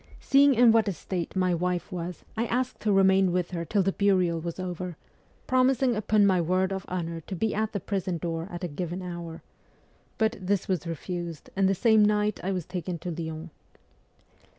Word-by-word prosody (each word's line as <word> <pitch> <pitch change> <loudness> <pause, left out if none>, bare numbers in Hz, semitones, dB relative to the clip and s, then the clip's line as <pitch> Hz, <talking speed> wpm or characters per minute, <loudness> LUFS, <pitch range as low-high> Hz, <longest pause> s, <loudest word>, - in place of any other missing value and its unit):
Seeing 275 0 +5
in 235 0 +7
what 225 -1 +3
a 200 - 0
state 180 0 -5
my 185 -1 +2
wife 180 +2 -1
was, 175 0 -5
I 230 +2 -1
asked 255 +2 -1
to 215 - 0
remain 190 -1 +4
with 180 0 -1
her 170 -2 -3
till 195 +4 +1
the 195 - +1
burial 185 -4 +2
was 170 +2 -5
over, 180 -2 -5 0.5
promising 255 -1 +3
upon 210 0 +3
my 185 -3 +3
word 185 +3 +1
of 190 -1 -5
honour 170 -2 -3
to 190 - -6
be 220 +4 0
at 220 +1 -1
the 200 - -2
prison 190 -2 -2
door 165 0 -3
at 175 0 -7
a - - 0
given 175 +4 -4
hour; 170 -2 -7 0.7
but 220 +1 +1
this 195 +1 0
was 180 -4 -1
refused, 170 0 -5
and 195 -1 +3
the 195 - +2
same 220 +2 +4
night 210 0 +2
I 190 - -1
was 180 -4 -2
taken 180 -1 -4
to 175 +2 -5
Lyons. 160 0 -6
185 Hz, 200 wpm, -27 LUFS, 175-210 Hz, 0.7 s, in